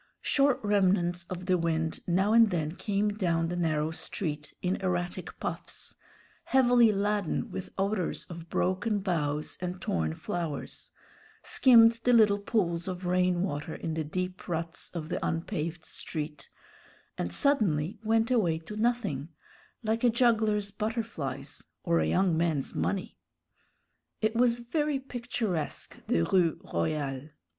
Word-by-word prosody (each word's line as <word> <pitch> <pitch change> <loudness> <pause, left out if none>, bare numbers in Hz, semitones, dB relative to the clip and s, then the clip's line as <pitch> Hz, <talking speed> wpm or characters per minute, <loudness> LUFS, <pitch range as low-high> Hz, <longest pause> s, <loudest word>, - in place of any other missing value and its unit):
Short 275 -2 +3
remnants 185 -4 +2
of 180 +1 -6
the 185 -1 +2
wind 160 -1 -1
now 190 +4 +2
and 230 -1 +7
then 160 -5 -1
came 205 +1 0
down 170 -5 0
the 175 - -2
narrow 155 -3 0
street 150 -3 -4
in 180 +1 +1
erratic 180 -2 -3
puffs, - - -4 0.5
heavily 245 -3 +5
laden 205 -3 -1
with 190 - -5
odors 195 -2 -1
of 170 -1 -9
broken 205 +4 0
boughs 155 -6 -1
and 180 0 -3
torn 80 - -1
flowers, 165 -5 -5 0.5
skimmed 230 -3 +6
the 245 - +4
little 210 -3 +5
pools 175 -5 0
of 185 -1 -4
rain 180 0 +2
water 150 -3 -3
in 160 - -4
the 160 0 -1
deep 180 +4 -4
ruts 165 0 -3
of 160 -2 -4
the - - -2
unpaved 165 -1 -2
street, 150 -1 -5 0.7
and - - -3
suddenly 205 - +1
went 225 +2 +2
away 185 -10 +3
to 165 +6 -9
nothing, 215 - 0 0.5
like 225 +2 0
a 245 - +6
juggler's 220 -4 +2
butterflies 215 - -4 0.2
or 85 - +2
a 80 - +1
young 180 - +2
man's 160 -4 0
money. 195 -2 -2 1.0
It 220 +1 0
was 240 0 +4
very 295 +4 0
picturesque, 240 - -3
the 85 - +2
Rue 170 - +2
Royale. 135 - -1
185 Hz, 135 wpm, -29 LUFS, 165-220 Hz, 1.0 s, and